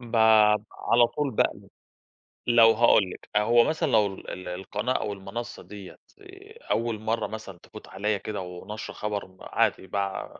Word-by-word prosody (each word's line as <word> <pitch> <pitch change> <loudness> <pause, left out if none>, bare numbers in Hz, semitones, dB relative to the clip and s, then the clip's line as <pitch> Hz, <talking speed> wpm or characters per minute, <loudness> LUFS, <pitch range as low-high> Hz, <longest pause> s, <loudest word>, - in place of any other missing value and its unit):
باب 110 -3 +4
على 120 0 +3
طول 145 +2 -2
باقلب، - - -1 0.8
لو 115 -2 +7
هاقول 110 -4 +4
لِك - - -12
آآ، 105 - +5
هو 120 +2 +5
مثلًا 155 +4 -1
لو 105 - +4
ال - - -11
ال 90 - -7
القناة 100 +7 -3
أو 105 - -2
المنصّة 100 +5 -7
دِيَّة 100 -3 -11 0.2
آآ، 400 +3 -15
أول 115 -2 0
مَرّه 110 +1 -1
مثلًا 105 -5 -9
تفوت - - -13
عليَّ 105 +1 -2
كده 105 -1 -5
وناشرة 90 +4 -8
خبر 105 -2 -4
م 95 0 -23
عادي 95 - 0
باع 100 +1 -4
110 Hz, 165 wpm, -26 LUFS, 100-120 Hz, 0.8 s, لو